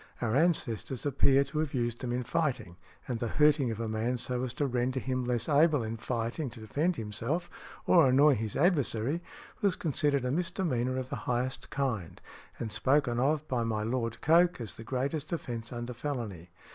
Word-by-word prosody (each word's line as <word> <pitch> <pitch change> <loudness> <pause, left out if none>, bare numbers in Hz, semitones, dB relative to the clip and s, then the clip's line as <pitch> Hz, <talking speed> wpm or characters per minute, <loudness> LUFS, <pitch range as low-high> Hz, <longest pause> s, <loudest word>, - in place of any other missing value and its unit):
Our 115 -1 0
ancestors 135 -6 +1
appear 140 0 +4
to 140 +2 -4
have 155 -3 -1
used 120 -1 -1
them 125 -2 -3
in 125 +1 -1
fighting, 120 - -1 0.3
and 125 -4 -2
the 120 - -1
hurting 150 -1 +3
of 110 -1 -4
a 115 - -2
man 110 +3 -1
so 125 +1 -2
as 130 - -2
to 145 - 0
render 125 0 0
him 130 0 -2
less 120 -1 0
able 150 -2 +4
in 110 +1 -4
fighting 120 +5 -2
to 120 - -11
defend 145 +11 0
himself 115 +9 -3 0.3
or 170 -6 +6
annoy 140 +3 +6
his 110 -3 -3
adversary, 145 - +1 0.4
was 200 -3 +2
considered 145 -4 0
a 125 - 0
misdemeanor 150 -7 -1
of 130 -1 -4
the 140 - -2
highest 125 +2 -1
kind, 120 - -2 0.4
and 110 - -4
spoken 125 +2 +2
of 150 +3 +1
by 125 -4 0
my 110 -2 -1
Lord 115 0 -2
Coke 170 +2 +4
as 115 -3 -6
the 115 - -9
greatest 140 +5 -2
offence 115 -8 -4
under 120 0 -5
felony. 115 - -5
130 Hz, 185 wpm, -30 LUFS, 115-145 Hz, 0.4 s, or